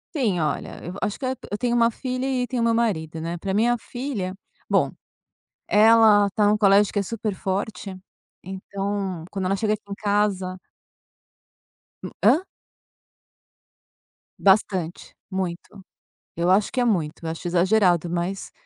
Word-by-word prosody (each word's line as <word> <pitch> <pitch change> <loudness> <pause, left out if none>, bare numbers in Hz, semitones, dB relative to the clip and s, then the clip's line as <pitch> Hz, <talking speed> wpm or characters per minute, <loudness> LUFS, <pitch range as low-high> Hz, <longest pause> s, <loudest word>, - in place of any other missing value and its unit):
Sim. 220 - +1
Olha, 155 - -3
eu 175 - -6
acho 205 - -2
que 270 - -4
e - - 0
eu 260 - -2 0.2
eu 205 - -1
tenho 240 0 0
uma 235 0 +4
filha 255 +2 -4
e 255 -2 0
tenho 245 0 -2
o - - +3
meu 230 - +3
marido, 165 -9 -1
né, 170 +1 -3
pra 190 +2 -3
minha 235 +4 +2
filha 230 -6 -5 0.3
bom, - - +2 0.8
ela 215 -1 +6
tá 205 +1 +2
num 210 - +4
colégio 200 -1 +4
que 205 - +1
é - - 0
super 215 0 -3
forte, 195 0 -4 0.5
então, 195 -1 -4
quando 190 -2 -3
ela 195 - +1
chega 215 +1 +1
aqui 215 - -8
em - - -2
casa 200 -3 0 1.5
Hum, - - -6
hã? 310 - +6 2.0
Bastante, 190 -3 +1
muito. 190 +1 -5 0.5
Eu 170 +1 +1
acho 200 +2 +3
que 255 - 0
é 245 - +3
muito, 165 -7 -1
acho 165 +2 -5
exagerado, 180 -1 +3
mas 175 +3 -3
200 Hz, 155 wpm, -24 LUFS, 185-225 Hz, 2.0 s, ela